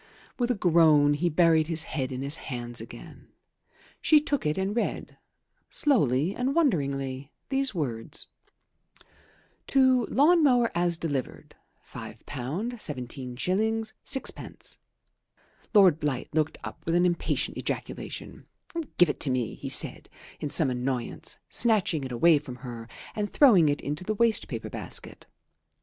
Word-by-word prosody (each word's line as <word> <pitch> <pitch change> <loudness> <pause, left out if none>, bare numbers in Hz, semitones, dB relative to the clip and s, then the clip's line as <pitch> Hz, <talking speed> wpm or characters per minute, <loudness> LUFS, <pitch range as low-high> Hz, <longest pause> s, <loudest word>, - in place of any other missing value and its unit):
With 240 0 +1
a 245 - +2
groan 160 -6 +4
he 175 +4 0
buried 160 -1 +3
his 160 -1 +3
head 135 -3 -3
in 130 +1 -4
his 140 +3 +1
hands 120 -2 -5
again. - - -12 0.7
She 310 - +6
took 285 - -1
it 150 - -1
and 190 +2 -1
read, 235 - -3 0.5
slowly 175 - +2
and 260 +3 -1
wonderingly, 140 - 0 0.2
these 270 -4 0
words: 120 -9 -4 1.4
"To 260 -2 +4
lawn 325 +5 +4
mower 245 -5 +4
as 170 0 +1
delivered, 145 -7 -4 0.3
£5 - - -9
17s. 135 - -5 0.6
6d." 265 -1 -3 0.9
Lord 190 -8 +6
Blight 145 -5 -2
looked 155 0 0
up - - -8
with 165 - +1
an 175 +1 +4
impatient 175 -1 0
ejaculation - - -6 0.5
"Give 175 - +6
it 145 - -3
to 140 - +3
me," 125 -3 -1
he - - -7
said - - +2 0.3
in 150 - -3
some 140 -3 +3
annoyance, 125 0 -3
snatching 205 - +1
it 130 - -6
away 150 +6 +4
from 135 -4 -9
her 115 -2 -7 0.3
and 205 -1 -2
throwing 200 - +6
it 145 - -1
into 150 +5 -4
the 215 +3 -2
waste 225 0 +2
paper - - -6
basket. - - -5
160 Hz, 135 wpm, -27 LUFS, 135-215 Hz, 1.4 s, She